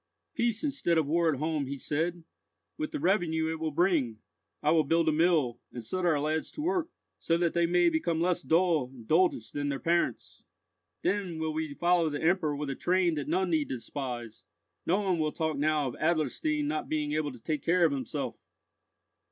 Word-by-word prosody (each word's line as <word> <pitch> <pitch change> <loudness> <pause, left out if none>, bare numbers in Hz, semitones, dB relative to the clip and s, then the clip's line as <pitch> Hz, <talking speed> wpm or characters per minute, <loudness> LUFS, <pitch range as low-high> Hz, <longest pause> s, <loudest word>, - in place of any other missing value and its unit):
"Peace 235 -6 0
instead 275 - +1
of 160 - +2
war 165 +2 +2
at 140 - -2
home," 155 -1 -1
he 140 +1 -4
said; 165 +5 -2 0.5
"with 310 -1 -3
the 305 - -3
revenue 165 -6 +1
it 160 - -4
will 160 0 -1
bring, 155 - +1 0.5
I 150 - +3
will 160 -1 +4
build 165 +3 +2
a - - +5
mill, 155 -7 +2
and 120 - -7
set 185 +7 -1
our 155 -4 +3
lads 155 +2 -1
to - - -5
work, 350 -1 0 0.3
so 165 - +1
that 170 -1 +1
they 170 0 +2
may 175 0 +3
become 165 0 +1
less 175 +1 +1
dull 165 -5 +2
and 120 -4 -13
doltish 160 -8 +2
than 145 0 -2
their 140 - -1
parents. 170 +1 -1 0.6
Then 190 -5 -1
will 160 -1 -2
we 155 -2 -3
follow 175 -1 +2
the 145 -1 -3
Emperor 160 -3 +2
with 145 -1 -3
a - - -4
train 180 +1 +2
that 145 -3 -3
none 180 +3 0
need 155 -3 +1
despise! 120 -3 -6 0.4
No 190 +5 +2
one 185 -4 0
will 155 -1 +1
talk 160 -1 -1
now 150 -1 +1
of - - -8
Adlerstein 155 -2 0
not 155 +1 -2
being 150 -1 -1
able 150 -1 -1
to 125 - -12
take 150 -3 -2
care 175 +3 +3
of 160 - +3
himself!" 135 -4 -4
160 Hz, 200 wpm, -29 LUFS, 145-175 Hz, 0.6 s, a